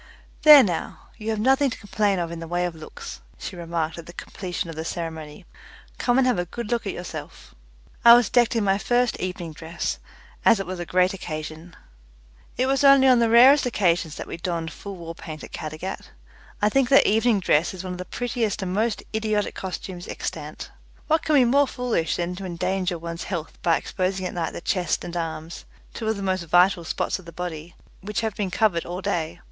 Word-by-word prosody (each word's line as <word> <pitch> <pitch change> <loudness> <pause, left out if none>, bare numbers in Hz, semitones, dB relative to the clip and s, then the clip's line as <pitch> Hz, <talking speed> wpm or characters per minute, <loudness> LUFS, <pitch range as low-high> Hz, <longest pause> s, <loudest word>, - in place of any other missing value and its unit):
"There 300 -3 +10
now, 175 -5 -4
you 220 -1 -5
have 220 - 0
nothing 270 +4 +3
to - - -6
complain 205 -1 0
of 170 -1 -2
in 170 - -6
the 165 - -7
way 175 +1 0
of 175 - -3
looks," 155 -1 -9 0.2
she - - -7
remarked 170 -1 -3
at 165 - -10
the 170 - -10
completion 180 -1 -5
of 165 - -7
the 160 - -4
ceremony. 160 0 -6 0.5
"Come 245 0 +2
and 265 - +4
have 250 -7 +2
a 175 - -1
good 235 +5 -6
look 235 -3 -1
at - - -2
yourself." 175 - -8 0.5
I 235 0 +10
was 240 0 +4
decked 240 -2 +3
in 225 - +2
my 195 0 +2
first 245 +1 +1
evening 180 -3 -4
dress, 160 +2 -4 0.4
as 225 -3 +5
it 195 - -3
was 185 0 -5
a 175 - -5
great 185 +1 +2
occasion. 160 -1 -7 0.8
It 255 - +2
was 270 +1 +1
only 275 -1 +7
on 255 -2 +6
the 230 -1 +3
rarest 255 +4 +7
occasion 180 -7 +1
that - - -5
we - - -7
donned 170 -1 -3
full 200 -1 -8
war 165 -2 -7
paint 155 -2 -9
at - - -10
Caddagat. 155 +5 -6 0.5
I - - +6
think 265 +2 +2
that 275 - +6
evening 220 0 +3
dress 170 -2 +2
is 185 -1 -7
one 185 -1 -4
of 180 - -8
the 180 - -5
prettiest 230 -4 -2
and 185 -1 -3
most 220 +2 0
idiotic 215 -2 0
customs 185 -1 -6
extant. - - -6 0.3
What 315 +1 +2
can 310 - +1
be 260 -3 +6
more 280 +4 +4
foolish 245 -12 -1
than 175 +1 -2
to 195 - -6
endanger 180 +1 -1
one's 170 0 -6
health 170 -4 -5
by 165 -1 +3
exposing 185 0 -2
at - - -4
night 170 -2 -3
the - - -6
chest 180 -3 0
and 175 0 -6
arms 165 0 -5 0.3
two 225 - -5
of 220 - +1
the 200 - -5
most 185 -1 0
vital 175 +2 +4
spots 170 - -2
of 185 - -15
the 170 - -10
body 170 -1 -6 0.3
which 210 +3 -3
have 220 -3 -2
been 200 -3 -2
covered 180 -3 +1
all 180 +2 -5
day? 175 -4 -2
185 Hz, 215 wpm, -24 LUFS, 170-225 Hz, 0.8 s, There